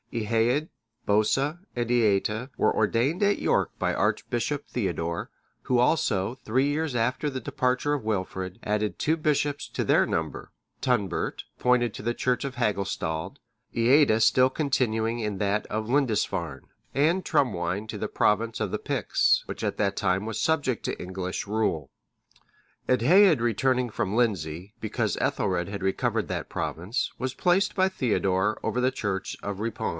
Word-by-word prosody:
Eadhaed, 115 Hz, +6 st, +1 dB, 0.4 s
Bosa, 135 Hz, +10 st, +2 dB, 0.2 s
and 120 Hz, -1 st, -2 dB
Eata, 110 Hz, +1 st, +1 dB
were -, -, +2 dB
ordained 120 Hz, -, +1 dB
at 205 Hz, 0 st, +3 dB
York -, -, +2 dB
by -, -, +1 dB
archbishop 140 Hz, +5 st, -1 dB
Theodore;(609) 85 Hz, -6 st, -2 dB, 0.4 s
who 125 Hz, -1 st, +4 dB
also, 120 Hz, -5 st, +1 dB
three 130 Hz, +5 st, +2 dB
years 145 Hz, -2 st, -1 dB
after 125 Hz, +6 st, 0 dB
the 130 Hz, -2 st, -4 dB
departure 130 Hz, +3 st, 0 dB
of 145 Hz, -5 st, -2 dB
Wilfrid, 95 Hz, -3 st, -3 dB
added 105 Hz, 0 st, -1 dB
two 160 Hz, -, +2 dB
bishops 145 Hz, -2 st, 0 dB
to -, -, -2 dB
their -, -, +4 dB
number: -, -, -3 dB, 0.3 s
Tunbert,(610) 110 Hz, -8 st, -1 dB
appointed 125 Hz, -3 st, +2 dB
to -, -, -7 dB
the 120 Hz, +3 st, -1 dB
church 125 Hz, -1 st, 0 dB
of 140 Hz, -2 st, -4 dB
Hagustald, 100 Hz, -, -2 dB, 0.4 s
Eata 120 Hz, 0 st, +4 dB
still 130 Hz, +3 st, +5 dB
continuing 120 Hz, -6 st, 0 dB
in 105 Hz, -3 st, -2 dB
that 100 Hz, +1 st, 0 dB
of 110 Hz, 0 st, -3 dB
Lindisfarne; 110 Hz, -, 0 dB, 0.3 s
and 165 Hz, +7 st, +2 dB
Trumwine(611) 105 Hz, -, 0 dB
to 110 Hz, -, -4 dB
the 105 Hz, -, -3 dB
province 110 Hz, +2 st, +1 dB
of 105 Hz, -4 st, -2 dB
the -, -, -2 dB
Picts, -, -, +2 dB
which -, -, -6 dB
at -, -, -1 dB
that 100 Hz, -1 st, +1 dB
time 95 Hz, 0 st, 0 dB
was 110 Hz, -1 st, -3 dB
subject 145 Hz, -7 st, 0 dB
to -, -, -3 dB
English 90 Hz, +1 st, -4 dB
rule. 100 Hz, -10 st, -1 dB, 1.0 s
Eadhaed 155 Hz, -, +5 dB
returning 125 Hz, +2 st, +1 dB
from 105 Hz, -1 st, -2 dB
Lindsey, 95 Hz, -5 st, -1 dB
because 110 Hz, -, -1 dB
Ethelred 85 Hz, +2 st, 0 dB
had 100 Hz, 0 st, -5 dB
recovered 95 Hz, 0 st, 0 dB
that -, -, -4 dB
province,(612) 100 Hz, +10 st, -3 dB
was 130 Hz, 0 st, -2 dB
placed 180 Hz, +2 st, +2 dB
by 190 Hz, -1 st, +4 dB
Theodore 105 Hz, -, 0 dB
over 125 Hz, -, -1 dB
the 130 Hz, +1 st, +2 dB
church 95 Hz, -4 st, -3 dB
of 100 Hz, 0 st, -4 dB
Ripon. 115 Hz, 0 st, -2 dB
115 Hz, 150 wpm, -26 LUFS, 100-130 Hz, 1.0 s, still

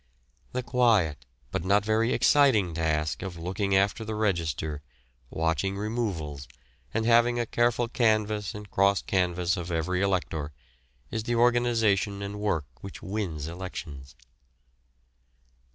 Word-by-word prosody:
The 125 Hz, 0 st, -2 dB
quiet, 110 Hz, -, +2 dB, 0.2 s
but -, -, -2 dB
not 100 Hz, +2 st, +2 dB
very 110 Hz, +2 st, +2 dB
exciting 115 Hz, -, +4 dB
task 80 Hz, -1 st, -1 dB
of 95 Hz, -3 st, -6 dB
looking 95 Hz, +4 st, -1 dB
after 100 Hz, +3 st, +2 dB
the 110 Hz, 0 st, -4 dB
register, 80 Hz, -7 st, -1 dB, 0.5 s
watching 80 Hz, +4 st, -1 dB
removals, 100 Hz, -, -3 dB, 0.4 s
and 110 Hz, -, -1 dB
having 120 Hz, +1 st, +4 dB
a 120 Hz, -, 0 dB
careful 120 Hz, +1 st, +1 dB
canvass 110 Hz, -3 st, +1 dB
and 105 Hz, 0 st, -8 dB
cross 100 Hz, +1 st, +3 dB
canvass 90 Hz, -1 st, 0 dB
of 90 Hz, 0 st, -5 dB
every 90 Hz, +2 st, -1 dB
elector, 85 Hz, -6 st, -1 dB, 0.6 s
is 110 Hz, -1 st, -3 dB
the 120 Hz, -, 0 dB
organisation 115 Hz, -4 st, +2 dB
and 100 Hz, +1 st, -5 dB
work 95 Hz, -8 st, 0 dB, 0.2 s
which 100 Hz, -, -9 dB
wins 95 Hz, -7 st, -3 dB
elections. 80 Hz, -6 st, -7 dB
100 Hz, 125 wpm, -27 LUFS, 85-110 Hz, 0.6 s, exciting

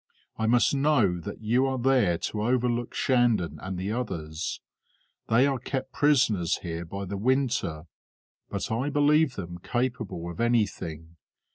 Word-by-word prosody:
I 110 Hz, -, -1 dB
must 120 Hz, +4 st, +4 dB
know 135 Hz, -11 st, +2 dB
that 100 Hz, +5 st, -8 dB
you 120 Hz, +5 st, +2 dB
are 130 Hz, 0 st, -1 dB
there 125 Hz, -9 st, +3 dB
to 105 Hz, +5 st, -3 dB
overlook 120 Hz, +1 st, 0 dB
Shandon 120 Hz, -9 st, +2 dB
and 95 Hz, 0 st, -5 dB
the 95 Hz, +3 st, -3 dB
others. 85 Hz, -9 st, -4 dB, 0.7 s
They 120 Hz, +4 st, +4 dB
are 135 Hz, -2 st, 0 dB
kept 130 Hz, +1 st, -4 dB
prisoners 115 Hz, -, +2 dB
here 85 Hz, -1 st, -4 dB
by 100 Hz, +4 st, -5 dB
the 100 Hz, +1 st, -4 dB
winter, 120 Hz, -, 0 dB, 0.7 s
but -, -, -4 dB
I 125 Hz, +6 st, 0 dB
believe 145 Hz, -1 st, +3 dB
them 85 Hz, -2 st, -6 dB
capable 120 Hz, -6 st, -3 dB
of 85 Hz, -, -6 dB
anything. 85 Hz, -9 st, -1 dB
115 Hz, 145 wpm, -27 LUFS, 90-130 Hz, 0.7 s, must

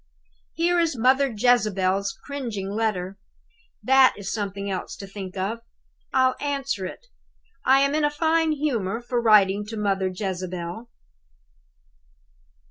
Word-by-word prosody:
"Here 345 Hz, +1 st, +2 dB
is 330 Hz, -6 st, +1 dB
Mother 260 Hz, +3 st, +3 dB
Jezebel's 200 Hz, -4 st, +1 dB
cringing 230 Hz, -9 st, -4 dB
letter. 200 Hz, -3 st, -2 dB, 0.6 s
That 265 Hz, 0 st, +5 dB
is 200 Hz, -1 st, -5 dB
something 200 Hz, -2 st, -4 dB
else 190 Hz, -2 st, -4 dB
to 195 Hz, -, -8 dB
think 195 Hz, -1 st, -8 dB
of. 200 Hz, +5 st, -2 dB, 0.5 s
I'll 260 Hz, -1 st, +3 dB
answer 275 Hz, -9 st, -2 dB
it. -, -, -11 dB, 0.6 s
I 270 Hz, +1 st, +5 dB
am 280 Hz, +1 st, +2 dB
in 305 Hz, 0 st, +1 dB
a 295 Hz, -, +4 dB
fine 320 Hz, +1 st, +1 dB
humor 235 Hz, -9 st, -1 dB
for 240 Hz, 0 st, -2 dB
writing 210 Hz, -3 st, +4 dB
to 225 Hz, 0 st, -6 dB
Mother 195 Hz, -2 st, 0 dB
Jezebel." 185 Hz, +2 st, -5 dB
220 Hz, 130 wpm, -24 LUFS, 195-270 Hz, 0.6 s, That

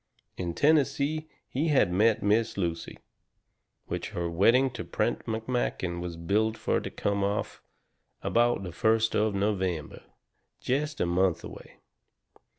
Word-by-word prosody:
In 85 Hz, -2 st, -4 dB
Tennessee 150 Hz, +1 st, +2 dB, 0.2 s
he 145 Hz, +6 st, -1 dB
had 130 Hz, -, +3 dB
met 105 Hz, +3 st, +3 dB
Miss 110 Hz, +2 st, +2 dB
Lucy. 85 Hz, -3 st, -3 dB, 0.9 s
Which -, -, -4 dB
her 85 Hz, -1 st, -1 dB
wedding 120 Hz, +10 st, +4 dB
to 120 Hz, -, -6 dB
Prent -, -, -2 dB
McMakin 110 Hz, -6 st, -2 dB
was 85 Hz, -1 st, -5 dB
billed 110 Hz, +6 st, 0 dB
fur -, -, 0 dB
to -, -, -5 dB
come 100 Hz, -1 st, -1 dB
off 100 Hz, +1 st, -2 dB, 0.6 s
about 120 Hz, -3 st, +2 dB
the 90 Hz, -, -5 dB
first 110 Hz, +5 st, +2 dB
of 105 Hz, -1 st, +1 dB
November, 95 Hz, -6 st, -1 dB, 0.6 s
jest 145 Hz, +3 st, -1 dB
a -, -, +3 dB
month 90 Hz, 0 st, +1 dB
away. -, -, -11 dB
110 Hz, 135 wpm, -28 LUFS, 90-125 Hz, 0.9 s, wedding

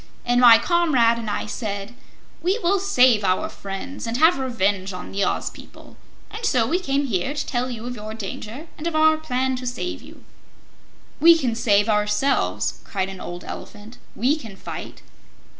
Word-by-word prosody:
And 245 Hz, 0 st, +3 dB
my 235 Hz, -2 st, +9 dB
comrade 250 Hz, -5 st, +2 dB
and 225 Hz, -2 st, -4 dB
I -, -, -2 dB
said: 205 Hz, 0 st, -5 dB, 0.5 s
'We 370 Hz, +5 st, +1 dB
will 385 Hz, +3 st, +3 dB
save 255 Hz, -, +4 dB
our 185 Hz, -1 st, +1 dB
friends 200 Hz, +7 st, -7 dB
and 230 Hz, +1 st, -2 dB
have 320 Hz, +1 st, +5 dB
revenge 200 Hz, -7 st, -1 dB
on 180 Hz, -, -8 dB
the 200 Hz, 0 st, -1 dB
Oz -, -, -1 dB
people,' -, -, -15 dB, 0.4 s
and 435 Hz, +2 st, -8 dB
so 250 Hz, -, +2 dB
we 335 Hz, +10 st, 0 dB
came 280 Hz, -5 st, 0 dB
here 245 Hz, +4 st, -1 dB
to 290 Hz, -, -2 dB
tell 250 Hz, 0 st, -2 dB
you 235 Hz, -2 st, -6 dB
of 245 Hz, 0 st, -5 dB
your 215 Hz, 0 st, -7 dB
danger 225 Hz, -, -7 dB
and 315 Hz, -, -3 dB
of 335 Hz, -, -2 dB
our 315 Hz, 0 st, +5 dB
plan 260 Hz, -4 st, -1 dB
to 250 Hz, 0 st, -6 dB
save 300 Hz, +8 st, -4 dB
you." -, -, -15 dB, 1.0 s
"We 335 Hz, +1 st, +7 dB
can 255 Hz, -7 st, -1 dB
save 205 Hz, -2 st, +2 dB
ourselves," 210 Hz, +5 st, 0 dB
cried 190 Hz, -2 st, -3 dB
an 190 Hz, -1 st, -9 dB
old 175 Hz, 0 st, -7 dB
Elephant. 215 Hz, +3 st, -10 dB, 0.2 s
"We 255 Hz, +8 st, +2 dB
can 225 Hz, -9 st, -10 dB
fight." -, -, -8 dB
245 Hz, 180 wpm, -23 LUFS, 210-285 Hz, 1.0 s, my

